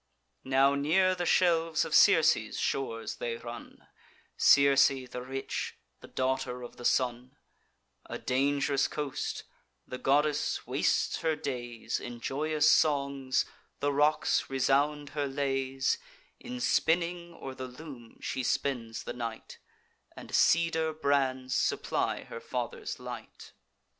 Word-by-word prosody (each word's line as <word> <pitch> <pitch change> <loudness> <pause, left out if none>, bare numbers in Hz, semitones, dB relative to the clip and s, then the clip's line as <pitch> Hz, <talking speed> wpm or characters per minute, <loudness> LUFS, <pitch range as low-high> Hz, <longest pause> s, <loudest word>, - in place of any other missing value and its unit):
Now 135 +1 +4
near 170 +7 +3
the 175 -1 -3
shelves 165 -3 +3
of - - -6
Circe's - - +5
shores 115 -4 -2
they 115 -1 -3
run, 120 0 -10 0.5
(Circe 140 -1 +6
the 130 -2 -5
rich, 135 +2 -4 0.2
the - - -13
daughter 130 -1 -2
of 120 - -10
the 120 - -8
Sun,) 125 +2 0 0.7
A - - -5
dang'rous 140 +1 +1
coast: 145 -3 -4 0.4
the 125 - -7
goddess 145 +3 +1
wastes - - +1
her 160 -1 0
days 125 -6 -4
In 120 -1 -7
joyous 150 +4 0
songs; 140 -3 +2 0.3
the 145 0 0
rocks 150 +2 +2
resound 140 +2 +1
her 145 -1 -2
lays: 135 - -1 0.4
In 250 0 -7
spinning, 170 -3 0
or 135 - -7
the 130 0 -6
loom, 125 -3 -11
she 130 - -3
spends 120 -3 -2
the 120 - -5
night, 115 -2 -6 0.6
And - - -10
cedar 160 -1 +3
brands 135 -4 0
supply - - 0
her 115 - -8
father's 120 0 -5
light. - - -9
135 Hz, 125 wpm, -30 LUFS, 130-150 Hz, 0.7 s, Circe